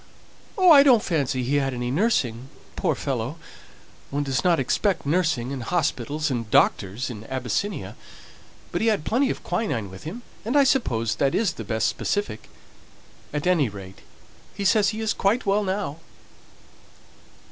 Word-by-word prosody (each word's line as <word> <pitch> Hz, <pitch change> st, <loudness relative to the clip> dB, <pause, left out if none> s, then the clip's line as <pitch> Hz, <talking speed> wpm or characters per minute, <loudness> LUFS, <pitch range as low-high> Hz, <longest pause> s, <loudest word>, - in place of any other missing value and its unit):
"Oh, 370 Hz, -3 st, +6 dB
I 285 Hz, -3 st, +10 dB
don't 255 Hz, -6 st, +5 dB
fancy 140 Hz, -6 st, 0 dB
he 140 Hz, +4 st, +1 dB
had 135 Hz, -2 st, 0 dB
any 120 Hz, 0 st, -3 dB
nursing, 135 Hz, -, 0 dB, 0.3 s
poor -, -, 0 dB
fellow! 130 Hz, +2 st, -3 dB, 0.7 s
One 145 Hz, +1 st, -1 dB
doesn't 150 Hz, +5 st, +1 dB
expect 180 Hz, -, 0 dB
nursing, 145 Hz, -6 st, 0 dB
and 135 Hz, -, -5 dB
hospitals, 150 Hz, 0 st, -1 dB
and 115 Hz, -4 st, -3 dB
doctors 110 Hz, +5 st, +2 dB
in 110 Hz, -3 st, -8 dB
Abyssinia; 130 Hz, -, -3 dB, 0.8 s
but -, -, -2 dB
he 225 Hz, -, +1 dB
had 210 Hz, -8 st, +1 dB
plenty 260 Hz, +4 st, +2 dB
of -, -, -4 dB
quinine 120 Hz, -, -2 dB
with 95 Hz, -, -11 dB
him, 215 Hz, +10 st, -7 dB, 0.2 s
and 240 Hz, +7 st, 0 dB
I 285 Hz, -, +7 dB
suppose 115 Hz, -, +1 dB
that 135 Hz, -1 st, +1 dB
is 205 Hz, -5 st, +1 dB
the 115 Hz, -, -7 dB
best 110 Hz, +1 st, 0 dB
specific. 205 Hz, -, -3 dB, 0.8 s
At 150 Hz, 0 st, -3 dB
any 170 Hz, -8 st, +3 dB
rate 95 Hz, -2 st, -10 dB, 0.6 s
he 200 Hz, -, -4 dB
says 205 Hz, 0 st, +4 dB
he 220 Hz, +1 st, -4 dB
is 220 Hz, -1 st, 0 dB
quite 215 Hz, +6 st, +1 dB
well 200 Hz, +1 st, +2 dB
now!" 190 Hz, -6 st, -2 dB
145 Hz, 160 wpm, -24 LUFS, 125-205 Hz, 0.8 s, I